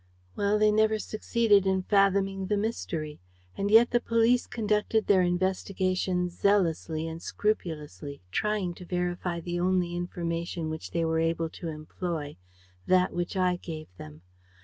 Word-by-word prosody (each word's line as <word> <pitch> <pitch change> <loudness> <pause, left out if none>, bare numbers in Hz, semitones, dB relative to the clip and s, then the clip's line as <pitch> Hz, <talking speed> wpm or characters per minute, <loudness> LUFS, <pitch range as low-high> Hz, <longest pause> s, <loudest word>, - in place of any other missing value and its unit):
"Well, 205 +1 +2
they 215 0 +4
never 220 0 +3
succeeded 215 -2 +2
in 190 -1 +1
fathoming 195 -1 +2
the 210 - +1
mystery. 165 -8 -3 0.4
And 200 +1 -1
yet 225 +3 +6
the 240 - +3
police 230 +1 +2
conducted 215 0 0
their 195 -2 +4
investigations 185 0 0
zealously 165 -5 +1
and 165 +1 -6
scrupulously, 150 - -3
trying 210 - 0
to 180 - -11
verify 180 -1 -2
the 175 +1 -3
only 180 -1 +1
information 170 -2 -3
which 155 - -6
they 170 -1 -1
were 160 0 +1
able 165 0 0
to 170 - -7
employ, 155 -1 -5 0.5
that 185 0 +3
which 175 +2 -3
I 180 -1 +2
gave 155 - -8
them. 75 +2 -11
180 Hz, 145 wpm, -28 LUFS, 165-205 Hz, 0.5 s, yet